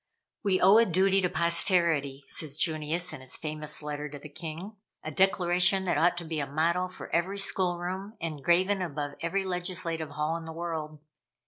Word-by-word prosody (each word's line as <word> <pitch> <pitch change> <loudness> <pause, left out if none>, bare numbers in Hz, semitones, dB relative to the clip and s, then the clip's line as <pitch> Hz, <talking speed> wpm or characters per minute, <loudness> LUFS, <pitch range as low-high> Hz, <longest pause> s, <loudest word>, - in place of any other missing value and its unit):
"We 195 -3 +1
owe 195 +4 +7
a 230 - +5
duty 190 +2 +3
to 180 - +1
posterity," 170 -5 +3
says 150 -2 -1
Junius 160 +2 0
in 145 - -8
his 130 -1 -2
famous 155 -1 -3
letter 150 0 -4
to 145 - -8
the 150 +2 -11
king. 165 +7 -7 0.3
A 155 - -5
declaration 180 +1 +3
that 175 -5 0
ought 175 +2 +3
to 175 - -4
be 160 -1 -3
a 140 - -2
motto 170 +5 0
for 185 - -10
every 180 +4 0
schoolroom, 190 +2 -1
and 155 -4 -5
graven 185 +4 +3
above 145 -4 -4
every 190 +4 -1
legislative 175 -3 -3
hall 150 +3 -2
in 165 - -9
the 160 - -7
world. 160 -2 -5
170 Hz, 185 wpm, -28 LUFS, 155-185 Hz, 0.3 s, owe